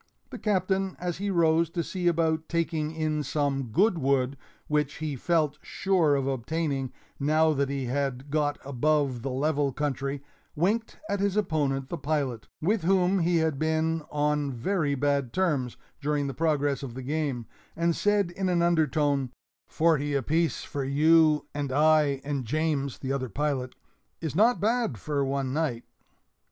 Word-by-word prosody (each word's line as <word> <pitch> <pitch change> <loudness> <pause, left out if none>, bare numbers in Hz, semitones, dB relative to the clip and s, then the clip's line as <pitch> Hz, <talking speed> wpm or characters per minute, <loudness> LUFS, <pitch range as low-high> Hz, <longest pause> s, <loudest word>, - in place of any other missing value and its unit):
The - - -7
Captain, 190 -2 0
as 175 0 -3
he 200 +1 -1
rose 165 -3 +3
to 170 0 -2
see 180 +1 -2
about 160 -1 +1
taking 165 -2 -1
in 155 -1 -1
some 145 -1 -1
good 175 - +2
wood, 135 -1 +1 0.3
which 150 -1 0
he 150 -2 -3
felt 155 +1 0
sure 175 -7 +1
of 135 -1 0
obtaining 135 +1 -2 0.3
now 155 +2 +3
that 140 -1 0
he 140 -2 -2
had 135 +1 -2
got 150 -1 +1
above 140 -1 +1
the 135 - -3
level 140 +1 0
country, 140 0 -3 0.3
winked 210 +8 0
at 200 - -1
his 200 0 0
opponent, 145 -8 0
the 170 - -4
pilot, 140 -7 -2
with 200 +6 +1
whom 190 +2 +3
he 170 0 +2
had 160 -4 0
been 160 +1 +1
on 150 -1 0
very 145 +3 0
bad 140 -2 0
terms 150 -10 0 0.2
during 145 0 0
the 135 - -3
progress 145 -3 0
of 125 -4 -7
the 130 - -6
game, 140 -4 -2 0.3
and 170 0 +1
said, 205 -3 +1
in 190 +1 -2
an 175 -1 +2
undertone, 150 -5 +2 0.4
"Forty 150 -3 +1
apiece 160 +5 0
for 140 - -4
you 155 +2 +4
and 145 -2 -3
I 150 -1 +3
and 140 -2 -2
James" 140 +1 -1
[the 135 0 -3
other 130 -2 -2
pilot] 135 0 -2 0.4
"is 160 -3 -4
not 230 +6 +4
bad 225 - 0
for 140 +6 -1
one 135 -1 -1
night." 145 -7 -1
150 Hz, 160 wpm, -27 LUFS, 140-165 Hz, 0.4 s, you